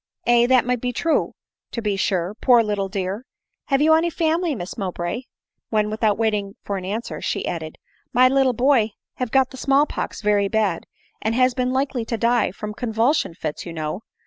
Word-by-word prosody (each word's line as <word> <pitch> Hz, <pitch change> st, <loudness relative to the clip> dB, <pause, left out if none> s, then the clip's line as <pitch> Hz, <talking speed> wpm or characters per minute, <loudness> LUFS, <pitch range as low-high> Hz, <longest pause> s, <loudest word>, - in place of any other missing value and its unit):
" -, -, -46 dB
Aye, 240 Hz, 0 st, +5 dB
that 255 Hz, -1 st, +4 dB
may 250 Hz, 0 st, +2 dB
be 245 Hz, +1 st, -2 dB
true, 325 Hz, +6 st, 0 dB, 0.4 s
to -, -, -2 dB
be 210 Hz, -3 st, -1 dB
sure, 190 Hz, -1 st, 0 dB
poor 240 Hz, +1 st, +4 dB
little 205 Hz, -2 st, -2 dB
dear! 195 Hz, +3 st, -3 dB, 0.4 s
Have 275 Hz, 0 st, +2 dB
you 315 Hz, +1 st, +6 dB
any 325 Hz, +2 st, +3 dB
family, 330 Hz, -1 st, 0 dB
Miss 180 Hz, -4 st, -6 dB
Mowbray 190 Hz, +4 st, -3 dB
?" -, -, -70 dB
— -, -, -57 dB
when, 210 Hz, -1 st, +1 dB
without 215 Hz, -1 st, +1 dB
waiting 210 Hz, -3 st, -1 dB
for 200 Hz, -, -3 dB
an 185 Hz, -, -6 dB
answer, 215 Hz, +5 st, -4 dB
she -, -, -2 dB
added, 160 Hz, -2 st, -5 dB, 0.3 s
"my 255 Hz, +1 st, +6 dB
little 265 Hz, -1 st, +3 dB
boy 245 Hz, -4 st, +3 dB, 0.2 s
have 250 Hz, -2 st, -2 dB
got 265 Hz, +1 st, +3 dB
the 260 Hz, -, -10 dB
small 275 Hz, +2 st, +3 dB
pox 245 Hz, -, -5 dB
very 205 Hz, -1 st, +3 dB
bad, 205 Hz, -5 st, 0 dB, 0.3 s
'and 220 Hz, +1 st, 0 dB
has 255 Hz, 0 st, +3 dB
been 250 Hz, 0 st, 0 dB
likely 265 Hz, -2 st, 0 dB
to 230 Hz, -, -2 dB
die 235 Hz, +1 st, +2 dB
Drom 210 Hz, +3 st, -6 dB
convulsion 230 Hz, -, 0 dB
fits, 155 Hz, -3 st, -4 dB
you 170 Hz, -, -7 dB
know. 155 Hz, +4 st, -4 dB
225 Hz, 205 wpm, -22 LUFS, 200-255 Hz, 0.4 s, you